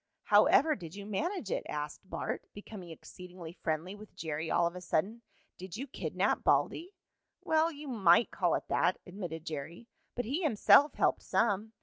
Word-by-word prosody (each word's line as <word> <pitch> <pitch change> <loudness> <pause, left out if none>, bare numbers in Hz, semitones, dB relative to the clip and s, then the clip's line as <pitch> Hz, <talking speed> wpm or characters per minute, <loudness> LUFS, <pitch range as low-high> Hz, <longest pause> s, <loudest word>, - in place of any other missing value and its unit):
"How - - +6
ever 310 +1 +4
did 170 -2 -9
you 200 0 -8
manage 270 - -3
it?" - - -1
asked 150 0 -4
Bart, - - -4
becoming 205 -3 -9
exceedingly 175 +1 -10
friendly 165 +2 -3
with 210 0 -13
Jerry 160 0 -4
all 175 - +3
of 170 +1 -2
a 180 - -7
sudden. 190 +6 -1 0.4
"Did 185 +1 -7
you 265 - -4
kidnap 275 - -1
Baldy?" 360 +5 +1 0.5
"Well, 320 +1 +2
you 295 -1 -9
might 215 -4 +4
call - - +1
it - - -4
that," - - +2
admitted 175 -4 -7
Jerry. 160 +8 -7 0.3
"But 245 - -2
he 280 - -2
himself 290 - +5
helped - - +2
some. 220 0 0
195 Hz, 175 wpm, -31 LUFS, 170-245 Hz, 0.5 s, How